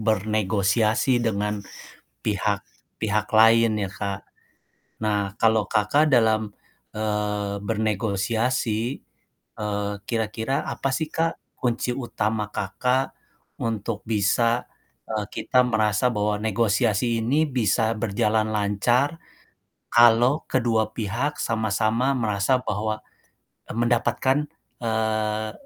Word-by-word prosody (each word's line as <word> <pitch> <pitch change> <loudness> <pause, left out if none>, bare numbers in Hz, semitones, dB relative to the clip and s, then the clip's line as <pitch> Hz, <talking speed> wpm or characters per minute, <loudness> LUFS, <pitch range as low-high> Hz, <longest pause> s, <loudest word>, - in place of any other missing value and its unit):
bernegosiasi 110 +3 +1
dengan 105 -2 -1 0.6
pihak 100 -1 -1 0.3
pihak 105 -1 0
lain 115 0 +5
ya, 95 -2 -2
Kak. 100 +2 -4 0.8
Nah 100 -2 0
kalau 110 -2 +4
Kakak 145 +9 +2
dalam, 110 -3 +3 0.4
eee, 105 -1 -1
bernegosiasi, 110 +2 0 0.8
eee, 105 -1 -2
kira-kira 115 +4 -1
apa 135 - -2
sih 155 +4 -1
Kak 165 +1 -1 0.2
kunci 125 0 0
utama 110 -4 -2
Kakak 125 +6 0 0.5
untuk 110 -1 -3
bisa, 115 +2 +2 0.5
eee, 110 -2 -2
kita 125 -1 +2
merasa 110 0 +2
bahwa 105 0 0
negosiasi 110 +1 +1
ini 145 +7 +2
bisa 110 -3 +1
berjalan 110 0 0
lancar 120 +9 +1 0.8
kalau 120 +5 +5
kedua 115 -4 +1
pihak 120 +7 -2
sama-sama 110 +3 +1
merasa 105 +1 +1
bahwa, 110 0 -2 0.7
e - - -5
mendapatkan, 120 +4 +1 0.3
eee, 110 -1 -1
110 Hz, 95 wpm, -24 LUFS, 105-120 Hz, 0.8 s, lain